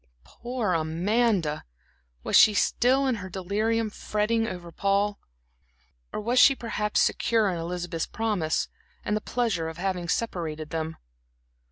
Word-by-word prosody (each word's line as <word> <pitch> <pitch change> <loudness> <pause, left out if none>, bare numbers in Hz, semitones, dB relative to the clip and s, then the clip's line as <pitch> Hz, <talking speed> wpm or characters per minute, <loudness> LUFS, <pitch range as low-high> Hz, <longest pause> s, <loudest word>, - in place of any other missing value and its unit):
Poor 235 - -3
Amanda! 170 +1 +1 0.6
Was - - 0
she 215 - +7
still, 260 +6 +2
in 260 - +2
her 190 - -7
delirium, 215 +4 -1
fretting 225 +2 0
over 180 -4 -7
Paul? 200 +2 0 0.9
Or - - -4
was 235 +4 +1
she, 275 - +7
perhaps, 215 -3 -1
secure 225 -3 +2
in 175 - -3
Elizabeth's 175 0 -3
promise, 210 -8 -1 0.4
and 210 - 0
the 215 - -1
pleasure 215 -11 -1
of 160 - -9
having 180 -2 -2
separated 160 -9 -2
them? 160 0 -3
200 Hz, 135 wpm, -26 LUFS, 170-225 Hz, 0.9 s, she